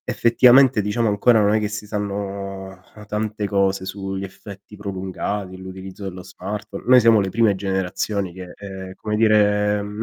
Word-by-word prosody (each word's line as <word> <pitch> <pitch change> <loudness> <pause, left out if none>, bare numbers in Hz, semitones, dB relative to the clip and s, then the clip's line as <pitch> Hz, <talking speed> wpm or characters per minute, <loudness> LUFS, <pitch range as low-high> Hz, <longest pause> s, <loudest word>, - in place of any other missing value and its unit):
effettivamente, 125 +1 +5
diciamo, 105 +3 0
ancora 110 +2 +4
non 105 +1 +3
è 110 - +2
che 105 - -1
si 105 0 -6
sanno, 100 -2 -4 0.3
uhm, 105 -1 -12
tante 105 0 -2
cose 100 -1 +1
sugli 95 0 -5
effetti 100 +1 -11
prolungati, 95 -1 -4
l'utilizzo 95 +1 -9
dello 90 -1 -6
smartphone 100 +3 -7
noi 125 0 +7
siamo 115 -2 +5
le 95 - -1
prime 110 0 +2
generazioni 95 0 -2
che, 90 -1 -10
uhm, 95 -1 -7
come 105 +2 -4
dire, 105 -1 +3
mhmm, 105 +2 -5
100 Hz, 160 wpm, -21 LUFS, 95-105 Hz, 0.3 s, noi